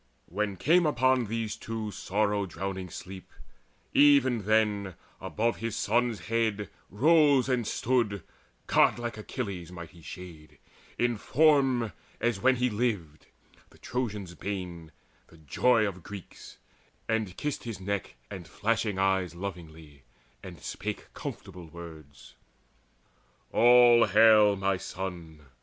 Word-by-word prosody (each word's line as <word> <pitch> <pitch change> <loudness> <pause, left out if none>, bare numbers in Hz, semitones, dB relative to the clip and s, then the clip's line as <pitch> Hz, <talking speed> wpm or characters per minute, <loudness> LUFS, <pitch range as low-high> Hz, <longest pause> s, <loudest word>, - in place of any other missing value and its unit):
When 100 +2 -3
came 165 - +3
on 130 -2 +2
these 110 0 -3
too 110 -1 -5
sorrow 100 +1 -1
drowning 95 +1 -5
sleep, 95 +3 -10 0.6
Even 130 -7 +4
then 105 -3 +1 0.2
above 115 +2 -1
his 115 -1 -4
son's 120 -3 0
head 110 -3 -1 0.2
rose 145 +2 +4
and 125 -4 0
stood 110 -7 0 0.4
Godlike 120 -2 +2
Achilles' 100 - -5
mighty 85 -1 -10
shade, 80 -3 -11 0.4
in 120 -1 +1
form 135 - +2 0.3
As 120 -4 0
when 130 +4 +4
he 125 0 +1
lived, 105 -10 -3 0.4
the - - -21
Trojans' 105 -8 -4
bane, 90 -4 -6 0.4
the 80 - -18
joy 110 - +2
Of 95 -2 -6
Greeks, 100 +1 -11 0.5
and 110 -5 -2
kissed 150 -3 -4
his 115 -5 -5
neck 100 -4 -4 0.2
and 90 -3 -8
flashing 110 -2 -1
eyes 95 -3 +1
Lovingly, 80 -6 -9 0.4
and - - -10
spake - - -6
comfortable 90 -2 -8
words: 80 -6 -12 1.2
"All 120 0 +6
hail, 105 0 +6
my 95 0 0
son! 90 -5 -7
105 Hz, 115 wpm, -28 LUFS, 90-120 Hz, 1.2 s, All